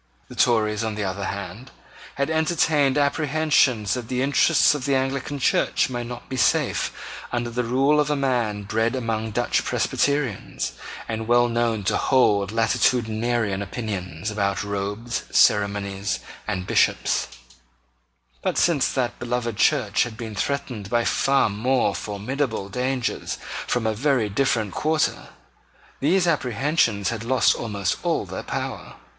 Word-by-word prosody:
The -, -, -10 dB
Tories, 110 Hz, -2 st, +2 dB
on 110 Hz, -1 st, -2 dB
the 105 Hz, -, -2 dB
other 95 Hz, +1 st, -3 dB
hand, 100 Hz, +6 st, -6 dB, 0.5 s
had 140 Hz, +3 st, -1 dB
entertained 155 Hz, -3 st, +2 dB
apprehensions 145 Hz, -, +2 dB
that 120 Hz, -3 st, -4 dB
the 125 Hz, +1 st, -1 dB
interests 145 Hz, +3 st, +4 dB
of 145 Hz, -3 st, -4 dB
the 140 Hz, -1 st, +2 dB
Anglican 135 Hz, +2 st, -1 dB
Church 130 Hz, -, +1 dB
might 120 Hz, -1 st, -4 dB
not 120 Hz, 0 st, -8 dB
be 130 Hz, -, -5 dB
safe 120 Hz, -, +1 dB, 0.4 s
under 120 Hz, -1 st, -2 dB
the 125 Hz, +1 st, -1 dB
rule 135 Hz, +5 st, +2 dB
of 150 Hz, 0 st, +1 dB
a 150 Hz, -, +1 dB
man 120 Hz, -7 st, 0 dB
bred 110 Hz, +4 st, 0 dB
among 115 Hz, -3 st, -2 dB
Dutch 120 Hz, +3 st, 0 dB
Presbyterians, 140 Hz, -, -1 dB, 0.4 s
and 110 Hz, -1 st, -4 dB
well 120 Hz, 0 st, +4 dB
known 115 Hz, -2 st, 0 dB
to -, -, +1 dB
hold 105 Hz, -7 st, +2 dB
latitudinarian 110 Hz, -1 st, +1 dB
opinions 100 Hz, -3 st, -4 dB
about 100 Hz, -2 st, -1 dB
robes, 100 Hz, +3 st, -3 dB
ceremonies, 100 Hz, -1 st, +2 dB, 0.3 s
and 95 Hz, -4 st, -2 dB
Bishops: -, -, +1 dB, 1.1 s
but, -, -, -1 dB
since 165 Hz, -6 st, +2 dB
that 125 Hz, -3 st, -2 dB
beloved 120 Hz, -2 st, -2 dB
Church 105 Hz, 0 st, +2 dB
had 115 Hz, -2 st, -2 dB
been 110 Hz, -2 st, -6 dB
threatened 120 Hz, -3 st, -3 dB
by 120 Hz, -1 st, +1 dB
far 135 Hz, 0 st, +3 dB
more 110 Hz, +1 st, +1 dB
formidable 110 Hz, +1 st, -3 dB
dangers 125 Hz, +2 st, -2 dB, 0.3 s
from 120 Hz, -2 st, 0 dB
a 110 Hz, -, +1 dB
very 125 Hz, -2 st, +1 dB
different 110 Hz, -3 st, 0 dB
quarter, 155 Hz, 0 st, 0 dB, 0.7 s
these 175 Hz, +6 st, +2 dB
apprehensions 125 Hz, -, +1 dB
had 115 Hz, -1 st, -4 dB
lost 130 Hz, +2 st, +3 dB
almost 100 Hz, -5 st, -2 dB
all -, -, 0 dB
their -, -, -6 dB
power. -, -, -5 dB
120 Hz, 140 wpm, -23 LUFS, 105-135 Hz, 1.1 s, interests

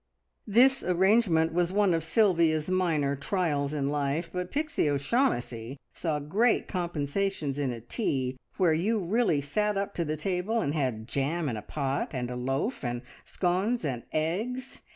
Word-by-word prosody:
This 260 Hz, +6 st, +5 dB
arrangement 180 Hz, -3 st, +3 dB
was 175 Hz, 0 st, +1 dB
one 200 Hz, -2 st, +3 dB
of 165 Hz, -1 st, 0 dB
Sylvia's 165 Hz, -4 st, +2 dB
minor 160 Hz, -7 st, +1 dB
trials 145 Hz, -2 st, -1 dB
in 140 Hz, -2 st, -1 dB
life, 145 Hz, +3 st, -1 dB
but 180 Hz, 0 st, -3 dB
Pixie 300 Hz, -, 0 dB
O'Shaughnessy 140 Hz, -, 0 dB, 0.2 s
saw 160 Hz, -3 st, -1 dB
great 195 Hz, +12 st, +1 dB
compensations 170 Hz, -3 st, -2 dB
in 140 Hz, -2 st, 0 dB
a 120 Hz, -2 st, -5 dB
tea 130 Hz, -, -2 dB, 0.2 s
where 180 Hz, -4 st, +4 dB
you 200 Hz, +8 st, +1 dB
really 195 Hz, -5 st, +1 dB
sat 210 Hz, +9 st, 0 dB
up 200 Hz, +1 st, -2 dB
to 170 Hz, -, -1 dB
the 155 Hz, -1 st, -2 dB
table, 185 Hz, +7 st, -1 dB
and 145 Hz, -9 st, -1 dB
had 125 Hz, -7 st, -2 dB
jam 150 Hz, +5 st, -1 dB
in 120 Hz, -, -1 dB
a 105 Hz, -, -5 dB
pot, 140 Hz, +3 st, -2 dB
and 125 Hz, -1 st, -2 dB
a -, -, -4 dB
loaf, 135 Hz, -, -2 dB
and 120 Hz, 0 st, -3 dB, 0.2 s
scones, 190 Hz, +4 st, 0 dB
and 125 Hz, -5 st, -2 dB
eggs. 220 Hz, +12 st, -2 dB
165 Hz, 160 wpm, -28 LUFS, 140-195 Hz, 0.2 s, This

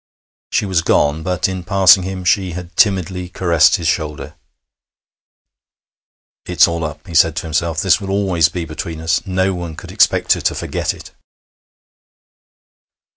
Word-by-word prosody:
She -, -, 0 dB
was 95 Hz, -4 st, 0 dB
gone, 75 Hz, -1 st, +1 dB
but 90 Hz, +1 st, -1 dB
in 95 Hz, -1 st, -5 dB
passing 95 Hz, 0 st, +5 dB
him 95 Hz, 0 st, -6 dB
she 95 Hz, -1 st, +1 dB
had 90 Hz, 0 st, -9 dB
timidly 95 Hz, -3 st, +1 dB
caressed 85 Hz, -3 st, +3 dB
his 85 Hz, -, -3 dB
shoulder. 75 Hz, -2 st, -3 dB, 2.1 s
'It's -, -, +4 dB
all 85 Hz, 0 st, -3 dB
up,' 75 Hz, -1 st, -6 dB
he 85 Hz, -, -11 dB
said 80 Hz, -1 st, +4 dB
to 85 Hz, -, -3 dB
himself. 80 Hz, 0 st, -2 dB
'This 95 Hz, +1 st, +2 dB
will 95 Hz, -, -6 dB
always 95 Hz, -5 st, +1 dB
be 85 Hz, -1 st, -5 dB
between 80 Hz, +1 st, -7 dB
us. 80 Hz, 0 st, 0 dB
No 95 Hz, +1 st, 0 dB
one 85 Hz, -3 st, -6 dB
could -, -, -10 dB
expect -, -, +3 dB
her -, -, -5 dB
to -, -, -1 dB
forget -, -, -3 dB
it.' -, -, -13 dB
85 Hz, 155 wpm, -17 LUFS, 80-95 Hz, 2.1 s, passing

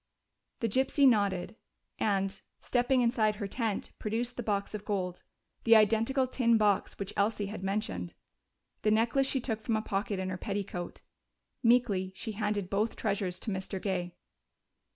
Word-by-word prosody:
The 230 Hz, -, +2 dB
gypsy 265 Hz, +5 st, +3 dB
nodded 200 Hz, -4 st, +2 dB, 0.4 s
and, 195 Hz, -1 st, 0 dB, 0.2 s
stepping 250 Hz, +1 st, +2 dB
inside 225 Hz, -3 st, +2 dB
her 205 Hz, -1 st, -4 dB
tent, 215 Hz, 0 st, -2 dB
produced 235 Hz, +3 st, -2 dB
the -, -, -3 dB
box 205 Hz, -3 st, -1 dB
of 210 Hz, -1 st, -5 dB
gold. 185 Hz, -4 st, -2 dB, 0.4 s
The 230 Hz, 0 st, +7 dB
identical 225 Hz, +5 st, +4 dB
tin 245 Hz, -2 st, +3 dB
box 205 Hz, -2 st, +1 dB
which 200 Hz, -1 st, -5 dB
Elsie 210 Hz, 0 st, +1 dB
had 200 Hz, 0 st, -6 dB
mentioned. 190 Hz, -, -2 dB, 0.7 s
The 215 Hz, -, +2 dB
necklace 230 Hz, +5 st, +3 dB
she 270 Hz, -, +1 dB
took 225 Hz, -3 st, -3 dB
from 225 Hz, 0 st, 0 dB
a 215 Hz, -, +1 dB
pocket 200 Hz, -1 st, -2 dB
in 185 Hz, 0 st, -2 dB
her 185 Hz, -, -3 dB
petticoat. 195 Hz, -3 st, -4 dB, 0.6 s
Meekly 225 Hz, -6 st, +3 dB
she 220 Hz, -, -5 dB
handed 210 Hz, -2 st, -1 dB
both 210 Hz, +4 st, 0 dB
treasures 190 Hz, -3 st, -1 dB
to 220 Hz, -, -2 dB
Mr. 190 Hz, 0 st, -3 dB
Gay. 180 Hz, -3 st, -2 dB
210 Hz, 155 wpm, -30 LUFS, 195-230 Hz, 0.7 s, The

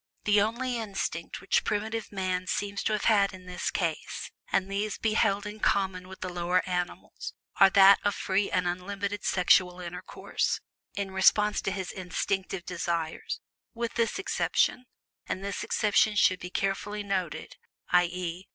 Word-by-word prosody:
The 205 Hz, -1 st, +4 dB
only 240 Hz, +4 st, -1 dB
instinct 195 Hz, -6 st, -4 dB
which 195 Hz, -, +2 dB
primitive 220 Hz, +2 st, -2 dB
man 185 Hz, -2 st, -2 dB
seems 200 Hz, +1 st, -2 dB
to 215 Hz, -, +2 dB
have 210 Hz, -, -1 dB
had 200 Hz, -3 st, +4 dB
in 185 Hz, -1 st, -13 dB
this 180 Hz, -1 st, -3 dB
case -, -, -3 dB, 0.2 s
(and 190 Hz, -, +2 dB
these 200 Hz, +1 st, -2 dB
he 220 Hz, -1 st, +2 dB
held 205 Hz, -2 st, +2 dB
in 210 Hz, +1 st, -7 dB
common 190 Hz, -3 st, +1 dB
with 190 Hz, 0 st, -11 dB
the 185 Hz, -1 st, -4 dB
lower 175 Hz, +1 st, +1 dB
animals) 180 Hz, -1 st, -4 dB, 0.2 s
was 195 Hz, -1 st, +8 dB
that 195 Hz, 0 st, +8 dB
of 205 Hz, -1 st, +1 dB
free 195 Hz, +1 st, 0 dB
and 180 Hz, 0 st, +1 dB
unlimited 200 Hz, +3 st, -3 dB
sexual 180 Hz, 0 st, +3 dB
intercourse, 180 Hz, 0 st, -3 dB, 0.4 s
in 200 Hz, -1 st, -3 dB
response 210 Hz, +2 st, +4 dB
to 195 Hz, -, -1 dB
his 190 Hz, -2 st, -4 dB
instinctive 185 Hz, 0 st, -3 dB
desires, 170 Hz, -2 st, -3 dB, 0.3 s
with 235 Hz, 0 st, -3 dB
this 230 Hz, -2 st, 0 dB
exception 320 Hz, -8 st, +1 dB, 0.4 s
(and 190 Hz, -, -3 dB
this 200 Hz, 0 st, -3 dB
exception 210 Hz, 0 st, +2 dB
should 185 Hz, -2 st, +4 dB
be 180 Hz, -, -6 dB
carefully 205 Hz, +2 st, -2 dB
noted), 190 Hz, -5 st, -3 dB, 0.3 s
i. 180 Hz, 0 st, +6 dB
e. 180 Hz, +1 st, -5 dB
195 Hz, 160 wpm, -28 LUFS, 180-205 Hz, 0.4 s, was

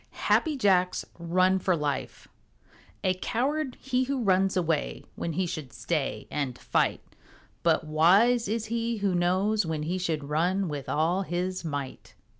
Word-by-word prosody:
HAPPY 310 Hz, -3 st, +3 dB
JACK'S 185 Hz, -6 st, +2 dB
RUN 185 Hz, +3 st, +2 dB
FOR 185 Hz, -1 st, +1 dB
LIFE 145 Hz, -3 st, -3 dB, 0.8 s
A 185 Hz, -, +3 dB
coward 265 Hz, +8 st, -2 dB
he 255 Hz, -1 st, 0 dB
who 265 Hz, -2 st, -1 dB
runs 190 Hz, -1 st, +2 dB
away 165 Hz, -4 st, -1 dB
When 165 Hz, -, -3 dB
he 185 Hz, +4 st, 0 dB
should 155 Hz, -6 st, -5 dB
stay 155 Hz, -5 st, -2 dB
and 135 Hz, -4 st, -2 dB
fight, -, -, 0 dB, 0.6 s
But 165 Hz, -2 st, +2 dB
wise 195 Hz, +10 st, +4 dB
is 220 Hz, +1 st, -1 dB
he 230 Hz, +1 st, -2 dB
who 200 Hz, -2 st, 0 dB
knows 185 Hz, +5 st, +2 dB
when 160 Hz, -2 st, -3 dB
he 175 Hz, +4 st, -2 dB
Should 160 Hz, -5 st, -1 dB
run 175 Hz, +7 st, 0 dB
with 145 Hz, -2 st, -5 dB
all 165 Hz, +5 st, +1 dB
his 185 Hz, 0 st, -2 dB
might. 145 Hz, -4 st, -5 dB
185 Hz, 150 wpm, -27 LUFS, 160-210 Hz, 0.8 s, wise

